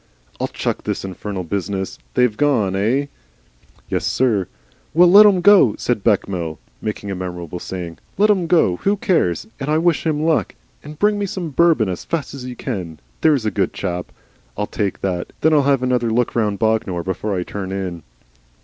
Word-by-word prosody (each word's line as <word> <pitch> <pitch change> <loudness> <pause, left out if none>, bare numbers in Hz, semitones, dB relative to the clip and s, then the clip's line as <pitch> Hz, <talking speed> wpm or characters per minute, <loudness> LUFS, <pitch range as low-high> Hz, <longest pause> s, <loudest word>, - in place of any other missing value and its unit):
"I'll - - 0
chuck - - -3
this - - -3
infernal 95 0 -5
business! 95 +1 -3 0.2
They've 125 -4 +3
gone, 115 -10 +1
eigh?" 120 +9 +1 0.8
"Yessir." 110 -8 0 0.5
"Well, 175 +2 +7
let 210 +2 +9
'em 190 -3 +3
GO," 180 - +6
said 120 -5 -1
Bechamel, 90 -7 0 0.2
making 105 -2 -4
a - - -3
memorable 90 -2 -6
saying. 85 -3 -6 0.2
"Let 210 +2 +5
'em 185 -5 +1
GO. 160 - +3
Who 200 - 0
cares? 175 - +1
And 135 +1 -4
I 155 - +3
wish 170 0 +2
him 155 -1 0
luck. 160 -1 +1 0.3
And 150 0 -10
bring 205 +3 +2
me 200 - -1
some 180 -4 -4
Bourbon 160 -7 +3
as 90 -2 -4
fast 160 -5 -3
as 135 -3 -7
you 125 -1 -6
can, 90 - -5 0.2
there's 145 -7 +3
a 110 - +1
good - - -1
chap. 90 0 -4 0.5
I'll 105 - 0
take 100 -2 -3
that, 90 -2 -1
and - - -24
then 160 +1 +4
I'll 150 - +5
have 135 -2 +2
another 125 -2 +1
look 120 +2 0
round 105 -3 +1
Bognor 110 -6 0
before 95 +2 -2
I 90 - -1
turn 95 0 -6
in." 95 -3 -4
110 Hz, 185 wpm, -20 LUFS, 95-155 Hz, 0.8 s, let